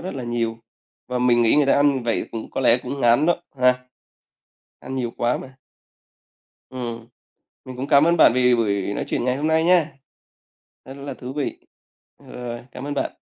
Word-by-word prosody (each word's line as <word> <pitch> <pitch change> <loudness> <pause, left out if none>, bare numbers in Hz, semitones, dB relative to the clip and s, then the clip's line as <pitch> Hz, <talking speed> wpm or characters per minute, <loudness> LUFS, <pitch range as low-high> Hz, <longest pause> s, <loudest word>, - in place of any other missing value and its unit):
rất 185 -2 -6
là 130 - -5
nhiều, 115 -1 -2 0.5
và 125 0 -2
mình 120 -1 +3
nghĩ 115 - +4
người 150 - +4
ta - - +4
ăn 145 0 +4
như 135 - -2
vậy 115 - 0
cũng 115 - -6
có - - -3
lẽ 125 -1 +4
cũng 135 +3 -6
ngán 120 +6 +4
đó, 175 0 +1 0.2
ha. 125 0 +5 1.1
Ăn 130 - -7
nhiều 125 -3 -2
quá 120 +1 +1
mà. 130 0 -11 1.1
Ừm. 120 -3 -6 0.6
Mình 130 -1 -9
cũng 130 - -4
cảm 140 +1 +5
ơn 170 +1 +3
bạn 155 - +6
vì 125 -1 +4
buổi 100 -3 0
nói - - -3
chuyện - - -2
ngày 125 0 0
hôm 150 +2 -2
nay 160 0 +2
nha. 170 -4 +3 0.9
Rất 135 - -9
là 140 0 -6
thú 130 +1 -8
vị. 145 -2 -3 0.6
Ờ, - - -21
rồi, 120 -1 -6
cảm 125 - -8
ơn 145 - -3
bạn. 140 - -3
125 Hz, 205 wpm, -22 LUFS, 120-140 Hz, 1.1 s, bạn